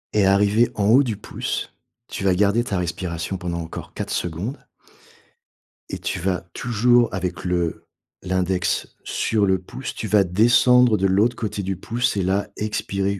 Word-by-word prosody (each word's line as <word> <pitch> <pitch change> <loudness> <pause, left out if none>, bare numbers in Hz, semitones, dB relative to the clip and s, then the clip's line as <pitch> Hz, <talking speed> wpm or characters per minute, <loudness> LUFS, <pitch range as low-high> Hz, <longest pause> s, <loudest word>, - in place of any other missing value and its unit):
Et 100 -2 +4
arrivé 105 +4 +3
en 100 - 0
haut 125 +5 +7
du 115 -7 -2
pouce, 105 - -4 0.3
tu - - -6
vas 95 -2 +3
garder 105 +4 +2
ta 105 -6 -2
respiration 85 +1 -3
pendant 90 -1 -4
encore 80 - -8
4 - - -4
secondes 90 - -4 1.3
et - - -5
tu - - -3
vas 90 -1 -1
toujours 120 0 +2
avec 90 -1 -3
le 85 -2 -1 0.4
l'index 95 0 -1
sur 105 -2 0
le 95 -1 +2
pouce, 130 +8 -7
tu 110 - -4
vas 105 -2 +4
descendre 120 +5 +4
de 95 +1 +2
l'autre 105 +6 +2
côté 105 -2 -3
du 95 0 -2
pouce 115 +6 -1
et 95 - 0
là, 95 +3 0
expirer 100 -2 -2
100 Hz, 165 wpm, -22 LUFS, 90-110 Hz, 1.3 s, haut